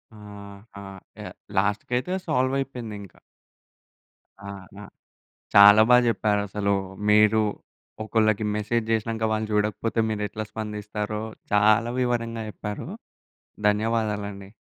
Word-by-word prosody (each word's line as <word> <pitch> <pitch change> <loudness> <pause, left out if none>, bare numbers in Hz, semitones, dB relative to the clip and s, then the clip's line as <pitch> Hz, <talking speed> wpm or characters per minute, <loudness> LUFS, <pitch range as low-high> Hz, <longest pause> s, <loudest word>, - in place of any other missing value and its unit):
ఆహా! 100 0 -12 0.4
యాహ్! - - -8 0.2
లాస్ట్‌కయితే 125 - 0
సాల్వయిపోయిందింక. 130 - -2 1.4
ఆహా! 100 +1 -11 0.7
చాలా 105 +1 +9
బాగా 125 0 +6
జెప్పారసలు. 105 -2 0 0.3
మీరు 105 +1 +5 0.6
ఒకళ్ళకి 110 -1 +1
మెసేజ్ 110 +2 -1
జేసినాంక 110 0 -1
వాళ్ళు 110 0 -1
చూడకపోతే 105 +2 -1
మీరెట్లా 105 0 -3
స్పందిస్తారో 105 0 -5 0.3
చాలా 110 +3 +4
వివరంగా 115 -2 -2
జెప్పారు. 105 0 -6 0.8
ధన్యవాదాలండి. 105 -2 -2
105 Hz, 80 wpm, -25 LUFS, 105-115 Hz, 1.4 s, చాలా